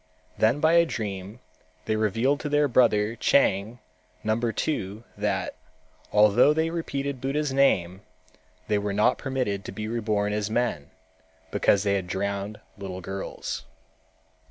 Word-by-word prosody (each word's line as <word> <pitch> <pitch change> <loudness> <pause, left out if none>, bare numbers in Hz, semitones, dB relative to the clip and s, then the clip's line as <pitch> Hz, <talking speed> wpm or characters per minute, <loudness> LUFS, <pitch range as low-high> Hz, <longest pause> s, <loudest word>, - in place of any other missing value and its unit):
Then 115 +6 +2
by 160 +2 +4
a 170 0 +6
dream 105 -2 -5 0.4
they 110 - 0
revealed 115 +7 +1
to 150 - -4
their 145 0 +3
brother 115 -4 +3
Chang 110 -4 +2 0.5
number 115 +2 0
two 110 -7 -3
that, 100 -2 -1 0.6
although 105 +8 +5
they 160 +1 +1
repeated 140 -5 -3
Buddha's 140 +1 -1
name, 95 -10 +2 0.7
they 105 -1 +2
were 100 0 -2
not 105 +5 +2
permitted 125 -8 -2
to - - -5
be 105 0 -5
reborn 105 -3 -1
as 105 0 -1
men, 110 -11 -1 0.6
because 100 -1 +3
they 100 -1 +1
had 95 -2 -1
drowned 100 +2 -3 0.2
little 95 -1 -6
girls. 95 +2 -5
110 Hz, 135 wpm, -26 LUFS, 100-135 Hz, 0.7 s, a